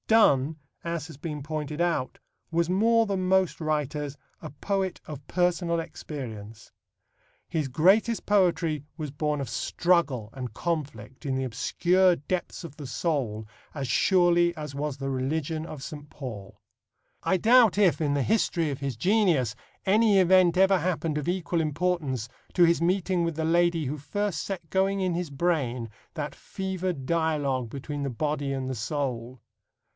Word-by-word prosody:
Donne, 155 Hz, -9 st, +4 dB, 0.3 s
as 170 Hz, -2 st, -3 dB
has 160 Hz, -, -10 dB
been 150 Hz, 0 st, -5 dB
pointed 150 Hz, 0 st, -4 dB
out, 170 Hz, -7 st, 0 dB, 0.3 s
was 170 Hz, 0 st, +1 dB
more 225 Hz, +5 st, +4 dB
than 190 Hz, -3 st, -1 dB
most 190 Hz, -3 st, +2 dB
writers 150 Hz, -2 st, -2 dB, 0.2 s
a -, -, -6 dB
poet 190 Hz, +5 st, -2 dB
of 145 Hz, -2 st, -8 dB
personal 175 Hz, -1 st, +1 dB
experience. 115 Hz, -10 st, -8 dB, 0.7 s
His 155 Hz, -4 st, -2 dB
greatest 195 Hz, -, +3 dB
poetry 175 Hz, -7 st, +2 dB
was 150 Hz, -4 st, -4 dB
born 150 Hz, +1 st, -1 dB
of 135 Hz, -, -3 dB
struggle 135 Hz, -2 st, +1 dB
and 125 Hz, -4 st, -6 dB
conflict 140 Hz, -5 st, -4 dB
in 135 Hz, -2 st, 0 dB
the 130 Hz, 0 st, -1 dB
obscure 175 Hz, +9 st, +2 dB
depths 175 Hz, +3 st, -4 dB
of 150 Hz, -3 st, -10 dB
the 145 Hz, -3 st, -8 dB
soul 125 Hz, -9 st, -2 dB, 0.3 s
as 140 Hz, -3 st, -3 dB
surely 175 Hz, -, +3 dB
as 150 Hz, -2 st, -6 dB
was 145 Hz, -1 st, -3 dB
the 135 Hz, 0 st, -3 dB
religion 155 Hz, +4 st, -2 dB
of 145 Hz, -5 st, -8 dB
St. 145 Hz, 0 st, -8 dB
Paul. 110 Hz, -10 st, -8 dB, 0.6 s
I 190 Hz, -, +2 dB
doubt 230 Hz, +1 st, +5 dB
if, 190 Hz, -5 st, +3 dB
in 145 Hz, -2 st, +1 dB
the 140 Hz, -1 st, +1 dB
history 175 Hz, -, +1 dB
of 140 Hz, -, -4 dB
his 135 Hz, -4 st, -3 dB
genius, 170 Hz, -, +2 dB, 0.3 s
any 210 Hz, 0 st, +4 dB
event 185 Hz, -1 st, +5 dB
ever 190 Hz, 0 st, +5 dB
happened 165 Hz, -3 st, -1 dB
of 150 Hz, -, -3 dB
equal 175 Hz, -2 st, 0 dB
importance 155 Hz, -6 st, -1 dB, 0.3 s
to 180 Hz, -, +6 dB
his 170 Hz, 0 st, +3 dB
meeting 180 Hz, 0 st, +1 dB
with 165 Hz, -2 st, -1 dB
the 160 Hz, 0 st, -1 dB
lady 170 Hz, -1 st, +2 dB
who 145 Hz, +4 st, -3 dB
first 195 Hz, +3 st, -2 dB
set 185 Hz, -4 st, -5 dB
going 195 Hz, +1 st, +2 dB
in 185 Hz, -2 st, 0 dB
his 170 Hz, -1 st, -2 dB
brain 135 Hz, -6 st, -1 dB, 0.3 s
that 150 Hz, -2 st, -4 dB
fevered 185 Hz, -6 st, -4 dB
dialogue 145 Hz, -6 st, 0 dB
between 145 Hz, +3 st, -5 dB
the 140 Hz, -, -1 dB
body 145 Hz, +2 st, -2 dB
and 135 Hz, -1 st, -2 dB
the 130 Hz, -, -2 dB
soul. 125 Hz, -1 st, -3 dB
155 Hz, 160 wpm, -27 LUFS, 140-180 Hz, 0.7 s, to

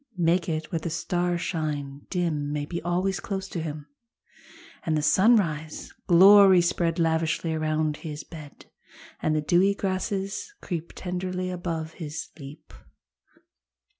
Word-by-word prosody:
Make 170 Hz, 0 st, +2 dB
it 155 Hz, -1 st, -3 dB
where 165 Hz, -, -1 dB
the 170 Hz, -, -4 dB
starshine 160 Hz, -5 st, -2 dB
dim 160 Hz, -6 st, -1 dB
May 150 Hz, -1 st, -2 dB
be 170 Hz, +3 st, -5 dB
always 180 Hz, +3 st, 0 dB
close 195 Hz, -2 st, -4 dB
to 170 Hz, -, -4 dB
him, 150 Hz, -2 st, -5 dB, 1.0 s
And 155 Hz, -2 st, 0 dB
the 150 Hz, -, -1 dB
sunrise 160 Hz, -4 st, +2 dB
glory 190 Hz, +1 st, +8 dB
spread 170 Hz, -1 st, 0 dB
Lavishly 165 Hz, 0 st, 0 dB
around 155 Hz, -1 st, 0 dB
his 150 Hz, -2 st, -7 dB
bed. 155 Hz, -4 st, -12 dB, 0.6 s
And 155 Hz, -, +1 dB
the 155 Hz, -, +1 dB
dewy 180 Hz, +6 st, +3 dB
grasses 195 Hz, -, -3 dB
creep 170 Hz, -2 st, -5 dB
Tenderly 185 Hz, 0 st, -3 dB
above 165 Hz, -3 st, -4 dB
his 150 Hz, 0 st, -5 dB
sleep. 150 Hz, +1 st, -13 dB
165 Hz, 130 wpm, -26 LUFS, 155-185 Hz, 1.0 s, glory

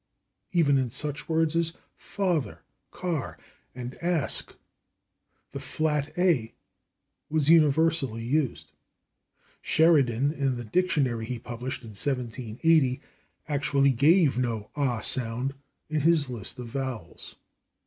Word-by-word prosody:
Even 145 Hz, -6 st, +3 dB
in 130 Hz, -2 st, -1 dB
such 145 Hz, +6 st, -4 dB
words 160 Hz, 0 st, +1 dB
as 165 Hz, -1 st, +1 dB, 0.3 s
/father/, 175 Hz, -, -2 dB, 0.3 s
/car/ 170 Hz, -7 st, -3 dB, 0.4 s
and 125 Hz, -1 st, -6 dB
/ask/ 170 Hz, -4 st, +1 dB, 1.0 s
the -, -, -6 dB
flat 150 Hz, -2 st, -1 dB
/a/ 170 Hz, -11 st, +1 dB, 0.8 s
was 155 Hz, 0 st, +2 dB
universally 155 Hz, -6 st, +3 dB
used. 135 Hz, +2 st, -1 dB, 0.9 s
Sheridan, 140 Hz, -5 st, +3 dB
in 135 Hz, -4 st, -1 dB
the 120 Hz, -, -6 dB
dictionary 130 Hz, -, 0 dB
he 125 Hz, 0 st, -3 dB
published 120 Hz, +3 st, -6 dB
in 115 Hz, -, -9 dB
1780, 125 Hz, -, 0 dB, 0.5 s
actually 140 Hz, -2 st, +2 dB
gave 145 Hz, +2 st, +4 dB
no 115 Hz, -4 st, -2 dB
/ah/ 125 Hz, -6 st, -1 dB
sound 125 Hz, +2 st, +1 dB, 0.3 s
in 155 Hz, -1 st, -1 dB
his 155 Hz, -3 st, +2 dB
list 115 Hz, 0 st, -5 dB
of 125 Hz, -, -6 dB
vowels. 125 Hz, -8 st, -6 dB
140 Hz, 110 wpm, -27 LUFS, 125-160 Hz, 1.0 s, gave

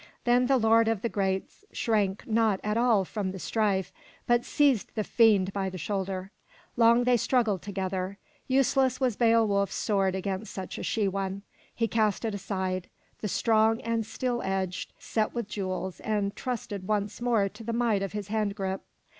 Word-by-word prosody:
Then 245 Hz, +1 st, +3 dB
the 270 Hz, 0 st, +4 dB
lord 225 Hz, -1 st, +4 dB
of 225 Hz, -3 st, 0 dB
the 235 Hz, -, 0 dB
Geats 190 Hz, -, -2 dB
shrank 205 Hz, -4 st, 0 dB
not 220 Hz, -3 st, +2 dB
at 210 Hz, 0 st, -1 dB
all 230 Hz, -5 st, +3 dB
from 200 Hz, 0 st, -3 dB
the 190 Hz, -, -7 dB
strife, 195 Hz, -2 st, 0 dB, 0.3 s
but 240 Hz, 0 st, +3 dB
seized 280 Hz, -7 st, +2 dB
the 215 Hz, -, 0 dB
fiend 205 Hz, -4 st, +3 dB
by 195 Hz, -1 st, -1 dB
the 185 Hz, -, -7 dB
shoulder. 190 Hz, +2 st, -3 dB, 0.4 s
Long 235 Hz, +1 st, +5 dB
they 245 Hz, 0 st, +4 dB
struggled 225 Hz, -6 st, +1 dB
together. 190 Hz, -1 st, -3 dB, 0.3 s
Useless 260 Hz, -1 st, +2 dB
was 255 Hz, -5 st, +1 dB
Beowulf's 220 Hz, -4 st, +3 dB
sword 195 Hz, -3 st, +1 dB
against 190 Hz, +2 st, -3 dB
such 190 Hz, -2 st, -6 dB
a -, -, -5 dB
she 215 Hz, -3 st, 0 dB
one. 195 Hz, 0 st, -3 dB, 0.3 s
He 230 Hz, -, +1 dB
cast 215 Hz, -1 st, +1 dB
it 220 Hz, -, -1 dB
aside, 185 Hz, -2 st, -3 dB, 0.3 s
the 210 Hz, -, -3 dB
strong 220 Hz, +2 st, +3 dB
and 230 Hz, -1 st, -1 dB
steel 245 Hz, +2 st, -2 dB
edged, 190 Hz, -1 st, -2 dB
set 220 Hz, +1 st, -2 dB
with 235 Hz, -3 st, -2 dB
jewels, 190 Hz, -2 st, -4 dB
and 205 Hz, -2 st, -1 dB
trusted 205 Hz, -6 st, -4 dB
once 210 Hz, +1 st, -1 dB
more 230 Hz, -5 st, +2 dB
to 210 Hz, +4 st, -12 dB
the 230 Hz, -, -3 dB
might 230 Hz, -4 st, +1 dB
of 195 Hz, 0 st, -3 dB
his 205 Hz, -1 st, -5 dB
hand 210 Hz, -2 st, 0 dB
grip. 190 Hz, -1 st, -3 dB
210 Hz, 175 wpm, -28 LUFS, 195-230 Hz, 0.4 s, Long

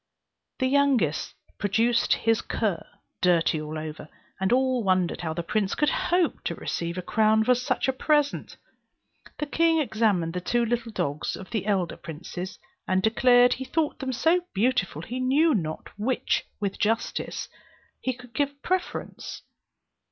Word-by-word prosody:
The 260 Hz, -, 0 dB
youngest 260 Hz, -, +2 dB, 0.2 s
produced 230 Hz, +4 st, +2 dB
his 225 Hz, -1 st, +1 dB
cur, 200 Hz, -7 st, -1 dB, 0.4 s
dirty 170 Hz, -3 st, +3 dB
all 155 Hz, +1 st, -5 dB
over, 155 Hz, 0 st, -7 dB, 0.3 s
and 190 Hz, +2 st, 0 dB
all 255 Hz, -1 st, +2 dB
wondered 185 Hz, -3 st, +1 dB
how 160 Hz, -2 st, -3 dB
the 170 Hz, -, -2 dB
prince 200 Hz, +2 st, 0 dB
could 295 Hz, -2 st, +2 dB
hope 350 Hz, -1 st, +1 dB
to -, -, -1 dB
receive 170 Hz, +1 st, -3 dB
a 185 Hz, -, -3 dB
crown 220 Hz, +2 st, +3 dB
for 250 Hz, -, +4 dB
such 250 Hz, +2 st, -1 dB
a 265 Hz, -, +2 dB
present. 295 Hz, +1 st, 0 dB, 0.8 s
The 300 Hz, -, -2 dB
king 330 Hz, +3 st, +2 dB
examined 215 Hz, -, +1 dB
the 180 Hz, -, -3 dB
two 240 Hz, +6 st, +1 dB
little 235 Hz, 0 st, -2 dB
dogs 155 Hz, -7 st, -2 dB
of 190 Hz, -, -10 dB
the 215 Hz, -3 st, -2 dB
elder 190 Hz, -5 st, 0 dB
princes, 175 Hz, +3 st, -7 dB, 0.3 s
and 185 Hz, 0 st, +1 dB
declared 245 Hz, +2 st, +5 dB
he 265 Hz, -, -5 dB
thought 305 Hz, +3 st, -1 dB
them 265 Hz, -1 st, -2 dB
so 325 Hz, +8 st, +3 dB
equally 355 Hz, 0 st, -7 dB
beautiful 195 Hz, -, +1 dB
that -, -, -11 dB
he 250 Hz, +2 st, -3 dB
knew 285 Hz, +5 st, +3 dB
not 160 Hz, -8 st, -2 dB
to -, -, -12 dB
which, 250 Hz, +4 st, 0 dB
with 200 Hz, -2 st, -3 dB
justice, 225 Hz, +2 st, -1 dB, 0.5 s
he 260 Hz, -, -1 dB
could 250 Hz, -1 st, -12 dB
give 285 Hz, +3 st, +1 dB
the 280 Hz, 0 st, -15 dB
preference. 370 Hz, 0 st, -3 dB
225 Hz, 165 wpm, -26 LUFS, 185-260 Hz, 0.8 s, declared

